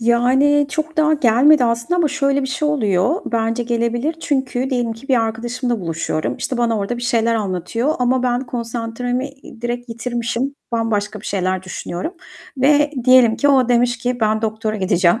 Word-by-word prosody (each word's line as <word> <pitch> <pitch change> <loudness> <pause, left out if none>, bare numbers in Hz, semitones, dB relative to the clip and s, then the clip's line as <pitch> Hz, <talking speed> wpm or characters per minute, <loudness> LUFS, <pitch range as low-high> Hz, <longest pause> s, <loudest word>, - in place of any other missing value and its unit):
Yani, 260 +5 +3
çok 315 +2 -3
daha 310 0 +3
gelmedi 265 +1 +4
aslında 235 +9 0
ama 335 -3 +2
şöyle 275 0 0
bir - - -1
şey 295 +3 -1
oluyor. 205 -11 +1 0.2
Bence 230 +1 0
gelebilir 240 +5 -1
çünkü 265 -2 -1
diyelim 240 -3 0
ki 230 +5 -13
bir 255 -4 +3
arkadaşımla 235 +1 -2
buluşuyorum. 165 -2 -2
İşte, 255 - -3
bana 230 -2 +1
orada 205 +5 -2
bir 240 - -7
şeyler 230 -2 +1
anlatıyor 225 - -1
ama 250 0 +1
ben 245 -1 +1
konsantremi, 240 +2 -3
iii, 270 -4 -15
direkt 240 +1 -3
yitirmişim, 235 +3 -3 0.2
bambaşka 215 -3 -1
bir - - -10
şeyler 185 -1 -1
düşünüyorum. 185 - -5 0.4
Ve 290 +2 +3
diyelim 255 -3 +6
ki 285 - +2
o 260 -3 +4
demiş 245 0 +2
ki: 245 0 -2
"Ben 215 0 +1
doktora 220 0 -2
gideceğim." 185 +1 +2
240 Hz, 170 wpm, -19 LUFS, 225-265 Hz, 0.4 s, diyelim